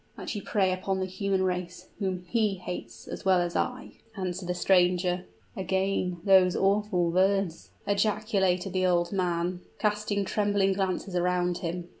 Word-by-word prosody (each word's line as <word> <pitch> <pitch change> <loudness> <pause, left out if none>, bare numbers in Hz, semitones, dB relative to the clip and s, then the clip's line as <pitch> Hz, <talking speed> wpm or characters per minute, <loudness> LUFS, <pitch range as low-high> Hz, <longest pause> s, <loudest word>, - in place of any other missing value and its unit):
"That - - -5
you 205 - -4
prey 190 -3 +1
upon 190 +1 -2
the 190 - 0
human 190 0 -1
race, 180 -1 -3
whom 185 -3 -2
he 215 -2 +1
hates 115 -11 -7
as - - -6
well 190 -2 +4
as 175 -1 -2
I," 255 +1 -3 0.2
answered 185 -1 -3
the 180 - 0
stranger. 180 0 +2 0.3
"Again 190 -2 -1
these 190 -2 +6
awful 195 -3 +2
words!" 190 -1 +1 0.2
ejaculated 200 -3 +1
the 185 0 +2
old 175 -1 +2
man, 180 -2 -1 0.2
casting 210 -1 0
trembling 205 -1 +1
glances 190 0 -2
around 180 0 +1
him. 175 0 -4
185 Hz, 150 wpm, -28 LUFS, 180-195 Hz, 0.3 s, these